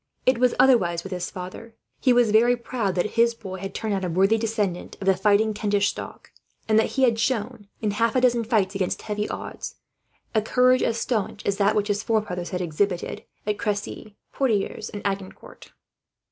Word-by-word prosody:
It 255 -2 +3
was 250 -1 +3
otherwise 175 -11 +4
with 195 - -8
his 180 -1 -3
father. 185 +5 -9 0.2
He 255 - +3
was 240 -3 +4
very 240 +3 +4
proud 235 -5 -2
that 185 +4 0
his 235 0 +3
boy 190 -4 -7
had 195 +1 -6
turned 220 -2 -2
out 195 -1 -1
a 180 - -1
worthy 195 +6 +3
descendant 210 -5 -2
of 195 - -6
the 190 0 +4
fighting 210 +3 +3
Kentish 205 -1 +1
stock; - - -8 0.4
and 220 0 +4
that - - 0
he 265 - +3
had 230 -3 +3
shown, 225 -2 -1 0.2
in 210 - +1
half 230 +3 +1
a 255 - +3
dozen 240 -2 +3
fights 215 -4 +1
against 195 -2 -2
heavy 210 -1 -3
odds, - - -6 0.6
a 220 - +3
courage 250 +3 +3
as 230 - 0
staunch 220 -3 -2
as 200 -1 0
that 205 +1 +3
which 210 -1 +1
his 205 -1 0
forefathers 210 -6 -1
had 180 -1 -3
exhibited 175 +2 -2 0.2
at 210 0 -1
Cressy, 210 0 -4 0.2
Poitiers, 225 -8 -1
and 205 - -7
Agincourt. 195 -1 -6
210 Hz, 195 wpm, -24 LUFS, 195-230 Hz, 0.6 s, otherwise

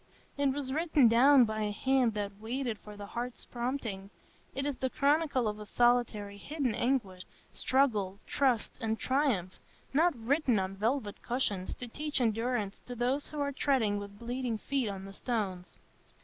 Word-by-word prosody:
It 280 -1 +2
was 265 -1 -3
written 310 -4 +4
down 250 +3 +7
by 215 0 -3
a 210 -1 0
hand 255 +1 +2
that 200 -1 -4
waited 235 0 -3
for 210 -1 -11
the 205 - -7
heart's 240 +4 -5
prompting; 235 -6 -4 0.5
it 270 +1 -1
is 285 -3 -2
the 260 - -1
chronicle 280 -3 +2
of 210 0 -3
a 210 - -7
solitary, 235 -4 +2
hidden 275 +2 -2
anguish, 225 -7 0 0.3
struggle, 215 -8 +1
trust, 255 -5 +1
and 225 -1 0
triumph, 255 - 0 0.3
not 325 +3 +4
written 250 +1 +1
on 190 0 -1
velvet 220 +1 -1
cushions 210 -7 -1
to 250 - -6
teach 295 +4 -3
endurance 225 -3 0
to 245 - -5
those 255 +4 0
who 300 - -6
are 280 0 0
treading 255 -7 +1
with 200 0 -9
bleeding 240 0 -2
feet 265 0 -1
on 195 -1 -6
the 195 - -9
stones. 195 -6 -3
240 Hz, 165 wpm, -31 LUFS, 210-270 Hz, 0.5 s, down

